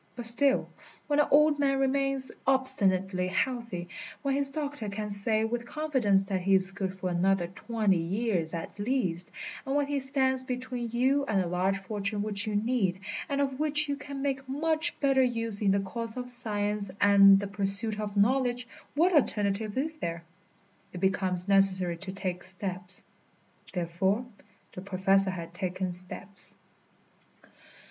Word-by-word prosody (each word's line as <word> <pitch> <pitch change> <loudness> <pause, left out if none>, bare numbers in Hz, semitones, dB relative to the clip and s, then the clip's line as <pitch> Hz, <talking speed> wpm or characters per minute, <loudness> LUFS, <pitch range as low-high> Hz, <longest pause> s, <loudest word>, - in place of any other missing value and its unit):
But 240 -1 -2
still, 265 +4 +4 0.4
when 290 0 +1
an 295 - +4
old 300 0 +4
man 275 -1 +2
remains 270 0 0 0.2
obstinately 195 -9 +3
healthy, 200 -2 -2 0.4
when 275 -1 0
his 280 0 +1
doctor 285 -6 -4
can 210 +1 -5
say 215 +2 0
with 235 +1 -3
confidence 260 -11 +1
that 195 -1 -2
he 195 +1 +3
is 190 0 +2
good 190 -1 -4
for 185 -1 -3
another 180 +1 +2
twenty 205 +1 0
years 180 -2 -1
at 165 +4 -7
least, 205 -7 -1 0.3
and 270 0 -2
when 290 0 +2
he 285 0 -1
stands 265 -1 0
between 250 -1 -4
you 260 +5 +2
and 205 -3 +1
a 185 - 0
large 185 +3 0
fortune 205 +1 -3
which 210 +1 -1
you 210 - -2
need, 205 -4 0 0.3
and 280 0 0
of 270 -1 -2
which 305 0 +3
you 285 - -1
can 280 -1 -7
make 270 -1 -2
much 315 +4 0
better 270 -2 +3
use 230 -4 -1
in 205 - +2
the 200 +1 +3
cause 225 +4 -5
of 250 0 -4
science 210 -4 -2
and 195 -1 +7
the 200 - -3
pursuit 205 +2 0
of 205 -1 -4
knowledge, 245 +3 +2 0.3
what 350 +5 +3
alternative 210 - +1
is 310 +4 -1
there? 170 - -4 0.7
It 180 - -6
becomes 185 -1 +2
necessary 190 -3 +4
to 190 +2 -7
take 185 -2 -4
steps. 185 -1 -4 0.7
Therefore, 190 +6 -1 0.5
the 185 - -7
Professor 195 0 +2
had 170 -2 -6
taken 185 0 -3
steps. 185 +2 -1
210 Hz, 160 wpm, -28 LUFS, 190-265 Hz, 0.7 s, and